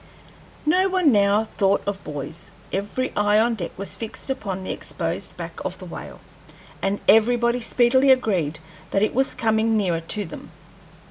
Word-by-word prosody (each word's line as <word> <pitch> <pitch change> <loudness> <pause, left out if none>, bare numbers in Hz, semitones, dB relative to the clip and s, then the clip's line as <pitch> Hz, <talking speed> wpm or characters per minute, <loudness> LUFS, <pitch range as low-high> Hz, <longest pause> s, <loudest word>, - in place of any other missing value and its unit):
No 370 +5 +3
one 365 -6 +3
now 205 0 +4
thought 200 -2 +1
of 200 -1 -3
buoys. 150 +3 -6 0.2
Every 205 +7 -2
eye 205 0 +3
on 235 +2 +3
deck 180 -7 -4
was 200 +1 -3
fixed 225 +4 -5
upon 195 -8 -4
the - - -3
exposed - - -4
back - - -7
of - - -4
the - - -10
whale, - - -9 0.6
and 195 +1 0
everybody 235 +2 +4
speedily 250 +3 +3
agreed 190 - +2 0.3
that 195 - +1
it 215 - +1
was 265 +2 +1
coming 220 0 +2
nearer 175 -5 0
to 205 +5 0
them. 160 - -10
215 Hz, 160 wpm, -23 LUFS, 195-240 Hz, 0.6 s, now